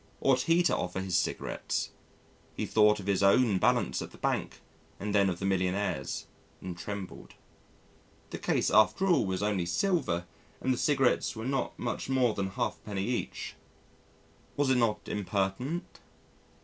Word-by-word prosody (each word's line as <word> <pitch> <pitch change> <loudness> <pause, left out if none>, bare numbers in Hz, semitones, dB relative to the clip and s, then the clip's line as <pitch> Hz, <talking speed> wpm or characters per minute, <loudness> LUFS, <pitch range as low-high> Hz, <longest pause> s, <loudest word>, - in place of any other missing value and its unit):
Ought 130 -1 +3
he 165 +5 +3
to - - +3
offer 90 +1 -3
his 95 -2 -2
cigarettes? - - -1 0.7
He - - -1
thought 105 -1 +4
of 95 - -8
his 100 -1 +1
own 100 0 +4
balance - - +2
at - - -6
the - - -15
bank - - -2 0.4
and 105 0 -3
then 100 -2 +4
of 90 - -2
the 95 - -4
millionaire's 95 -6 -1 0.3
and 90 -2 -6
trembled. 100 +1 -7 1.0
The - - -5
case - - +1
after 110 - +4
all 175 - +3
was 95 +1 -1
only 100 -5 0
silver 130 - 0 0.3
and 130 - +1
the - - -3
cigarettes 135 -5 +2
were 110 +1 -5
not 135 0 -1
much 120 +2 -3
more 130 -4 +3
than 100 -2 -2
a - - -5
halfpenny 95 +1 -3
each. 120 +1 -3 1.0
Was 140 -2 +2
it 130 - +4
not 110 -3 +1
impertinent? 105 - -2
105 Hz, 160 wpm, -30 LUFS, 95-130 Hz, 1.0 s, thought